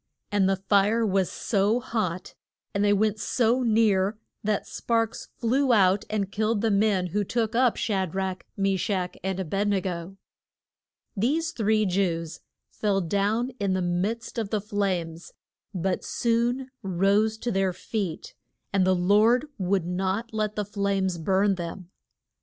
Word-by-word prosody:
And 200 -2 +3
the 195 - +3
fire 205 +4 +2
was 195 -3 +1
so 210 +2 +1
hot 195 -7 -3 0.4
and 200 - +1
they 205 - +4
went 215 +1 +2
so 245 +2 +1
near 215 -3 +2 0.3
that 210 -1 0
sparks 230 -1 -1
flew 260 +3 +2
out 195 -1 +4
and 200 -2 -2
killed 215 0 0
the 225 -1 +2
men 200 -2 +2
who 205 0 +1
took 225 +2 -1
up 245 0 +3
Sha 190 -4 0
drach, 190 +1 -3 0.2
Me 195 -1 +1
shach 180 -2 -1
and 190 0 -2
A 190 - -2
bed 195 +5 -1
ne 200 -1 +2
go. 180 0 -5 1.0
These 300 +11 0
three 215 -5 +1
Jews 175 -4 -1 0.3
fell 205 -2 0
down 205 +8 0
in 200 -2 0
the 185 - 0
midst 205 +8 -2
of 215 -3 -2
the 215 - 0
flames, 185 -5 -3 0.4
but 185 -1 -2
soon 240 +3 0
rose 200 +4 +2
to 240 +2 -3
their 195 -1 +1
feet, 185 -2 -4 0.4
and 190 -2 +3
the 185 - +4
Lord 210 +8 +4
would 190 -1 +1
not 190 +6 -2
let 215 -1 -1
the 210 - -1
flames 195 -3 -1
burn 195 +4 +2
them. 175 +1 -7
200 Hz, 155 wpm, -26 LUFS, 190-220 Hz, 1.0 s, they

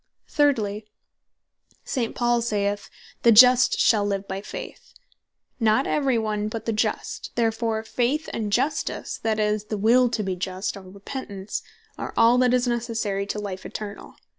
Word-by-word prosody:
Thirdly, 220 -8 +1 1.0
St. 240 -5 -2
Paul 240 -1 +2
saith 205 -3 -1
(Rom. - - -23
1.17.) - - -44
"The 235 - +6
Just 250 +2 +7
shall 215 -4 +4
live 200 -1 -2
by 190 +1 -4
Faith;" - - -9 0.6
not 225 +3 +3
every 275 -5 +1
one, 215 -1 -1
but 225 +1 -5
the 230 - 0
Just; 215 - -2
therefore 225 -1 0
Faith 255 +7 -1
and 215 -2 -3
Justice 270 +8 -1
(that 220 -1 0
is, 210 0 0
the 210 0 -4
Will 240 +4 +4
To 220 -2 -2
Be 190 -2 -2
Just, 185 +2 -3
or 195 - -9
Repentance) 200 +1 -6 0.4
are - - -5
all 230 +2 +5
that 250 -1 +4
is 250 0 +2
Necessary 225 -4 -2
to 210 - -3
life 200 -3 -5
eternall. 210 -1 -8
220 Hz, 165 wpm, -24 LUFS, 205-240 Hz, 1.0 s, Just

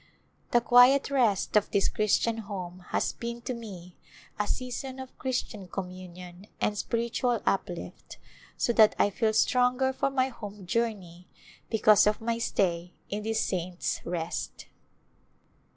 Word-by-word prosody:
The 240 - +4
quiet 250 +4 +6
rest 230 -9 +2
of 210 - +4
this 200 -1 +2
Christian 220 +2 +1
Home 185 -4 -6
has - - 0
been 235 0 -6
to 255 - -3
me 190 -7 -9 0.4
a 210 - 0
season 255 +1 -4
of 260 -1 -9
Christian 235 -6 -3
communion 180 0 -8
and 210 - 0
spiritual 235 +2 -1
up 195 - +1
lift, 175 - -9 0.4
so 235 - +1
that 220 -2 +6
I 205 - +3
feel 220 +2 +1
stronger 250 +3 +2
for 275 - 0
my 265 -1 +1
home 210 -5 -9
journey 185 -5 -2 0.4
be 225 - 0
cause 215 -1 +6
of 210 - +2
my 230 +1 -2
stay 180 -5 0 0.2
in 205 +1 -2
this 220 +1 0
" - - 0
Saints' 180 -1 -2
Rest." 170 0 -4
215 Hz, 150 wpm, -28 LUFS, 185-240 Hz, 0.4 s, quiet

